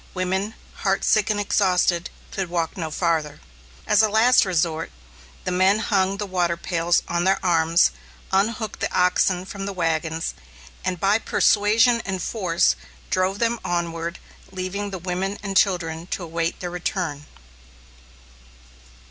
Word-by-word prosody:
Women, 190 +4 -1 0.2
heartsick 200 +2 +2
and 210 -1 +1
exhausted, 180 -3 +2 0.2
could 190 -3 -3
walk 170 -2 -2
no 165 -4 -4
farther. 155 -3 -1 0.5
As - - +4
a 215 - +3
last 225 +3 +5
resort, 165 -3 -1 0.5
the - - -2
men 185 +3 +4
hung 195 -3 +1
the 205 - -3
water 175 -3 0
pails 170 0 +1
on 170 0 0
their 190 +1 +3
arms, 165 0 +4 0.4
unhooked 215 +3 0
the - - -2
oxen 180 0 +2
from 195 0 -6
the 200 - -3
wagons, 165 -2 -1 0.5
and 180 -2 -2
by 200 +4 +3
persuasion 225 +3 +3
and 190 -1 -3
force, 170 - +1 0.4
drove 185 +1 +1
them 230 +1 0
onward, 170 0 -2 0.3
leaving 190 +2 -4
the 190 - -5
women 185 +3 -3
and 195 -1 -4
children 170 -4 +1
to 185 - -4
await 165 0 -3
their 175 -1 -4
return. 170 -4 -3
185 Hz, 140 wpm, -23 LUFS, 170-200 Hz, 0.5 s, last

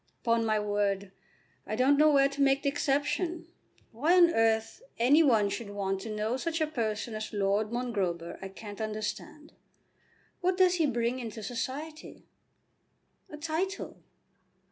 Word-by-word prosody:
"Upon 230 -1 +2
my 215 -1 +2
word 200 -1 -1 0.6
I 215 - -2
don't 260 +4 +4
know 305 +2 +5
where 275 -1 +5
to 280 0 -4
make 275 0 +3
the 280 - +2
exception. 295 +4 -1 0.5
Why 305 +11 +2
on 345 -1 +7
earth 225 - +1 0.2
any 270 +7 +5
one 225 -9 +4
should 205 +2 -5
want 195 -1 -2
to 225 - -6
know 215 +3 -1
such 330 +4 -2
a 315 - +2
person 230 -6 -3
as 215 0 -5
Lord 205 +1 0
Mongrober 195 -9 -2
I 195 - -5
can't 205 +2 -9
understand. 215 +8 -5 0.9
What 365 0 0
does 365 -1 +4
he 320 -3 +2
bring 240 0 -1
into 225 -2 -7
society?" 280 +8 -6 1.0
"A 300 - -8
title." 325 +6 -3
235 Hz, 150 wpm, -29 LUFS, 215-300 Hz, 1.0 s, on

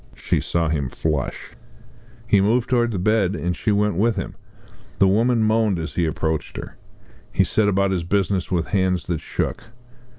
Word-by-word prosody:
She - - 0
saw 85 -1 0
him 75 -4 -1
flush. 75 -1 -3 0.7
He 100 - +4
moved 115 +5 +1
towards 120 -2 +2
the 100 - -2
bed, 100 0 +1
and 90 -2 -2
she 105 - -1
went 105 0 +2
with 115 +2 +2
him. 95 - -5 0.6
The 95 - +5
woman 115 +4 +3
moaned 110 -3 +2
as 80 0 -5
he 85 -2 0
approached 80 0 -2
her. - - -7 0.6
He - - +3
set 110 -1 +1
about 100 0 +1
his 90 -3 -1
business 95 0 0
with 85 -3 -1
hands 95 -3 +1
that 85 -3 -2
shook. - - -3
95 Hz, 175 wpm, -22 LUFS, 85-110 Hz, 0.7 s, The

